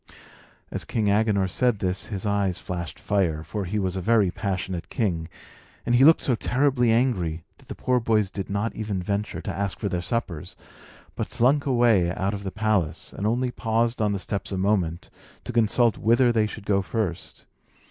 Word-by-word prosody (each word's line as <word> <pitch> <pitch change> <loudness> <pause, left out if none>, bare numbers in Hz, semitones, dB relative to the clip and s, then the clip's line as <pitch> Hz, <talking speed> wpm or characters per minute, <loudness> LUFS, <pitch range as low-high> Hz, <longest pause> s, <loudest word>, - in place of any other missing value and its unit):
As - - -3
King 110 -3 0
Agenor 100 -2 +2
said 120 +4 +1
this, 95 -1 -2
his 100 -3 -5
eyes 100 -3 0
flashed 85 -2 -6
fire 85 -6 0
(for 100 +5 -4
he 100 +4 -2
was 95 -2 -1
a 95 - -2
very 105 -2 +3
passionate 95 -3 -3
king), 85 -8 -1 0.6
and 120 - +1
he 120 +2 +5
looked 160 +3 +6
so 130 - +2
terribly 125 0 +2
angry 95 -10 +1 0.2
that - - -21
the - - -7
poor 125 -1 +1
boys 110 -4 +1
did 100 -1 -5
not 100 +3 -2
even 105 -3 -3
venture 100 +3 -2
to 95 - -5
ask 100 -1 -2
for 100 - -2
their 90 -1 -2
suppers, 90 -6 -3 0.6
but - - -3
slunk 130 +4 +2
away 120 -9 +4
out 95 +2 -1
of 100 - -4
the 95 -1 -5
palace, 105 -7 -1
and 100 - -2
only 125 +3 0
paused 115 0 0
on 105 -1 +2
the 100 - -1
steps 100 +2 -4
a 95 - -2
moment 95 -4 0 0.3
to 125 - -6
consult 115 0 +3
whither 120 +2 +4
they 110 -2 +2
should 105 0 -9
go 100 -1 +2
first. 95 -3 -4
105 Hz, 190 wpm, -25 LUFS, 95-115 Hz, 0.6 s, looked